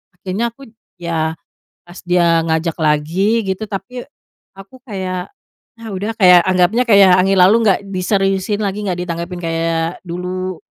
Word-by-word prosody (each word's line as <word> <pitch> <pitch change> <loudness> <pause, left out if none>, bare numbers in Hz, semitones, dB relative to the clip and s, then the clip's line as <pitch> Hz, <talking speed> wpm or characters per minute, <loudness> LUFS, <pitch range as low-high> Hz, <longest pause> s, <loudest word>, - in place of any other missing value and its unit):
akhirnya 190 +5 -3
aku 255 +4 -22 0.4
ya, 160 -2 -2 0.5
pas 175 +2 -13
dia 170 -2 +2
ngajak 160 0 -1
lagi, 170 +9 +1
gitu, 190 +3 -2
tapi 230 +4 -7 0.5
aku 195 +6 -14
kayak, 185 -5 -5 0.5
ah 225 - -8
udah 205 +3 -3
kayak 180 -4 +6
anggapnya 185 +6 +2
kayak 200 -4 +6
angin 195 +1 +2
lalu, 190 +5 +6
nggak 200 -4 +3
diseriusin 195 +1 -1
lagi, 205 +1 -3
enggak 180 -3 -2
ditanggapi 175 +1 -5
kayak 165 0 -2
dulu, 180 0 -5
185 Hz, 140 wpm, -17 LUFS, 170-200 Hz, 0.5 s, kayak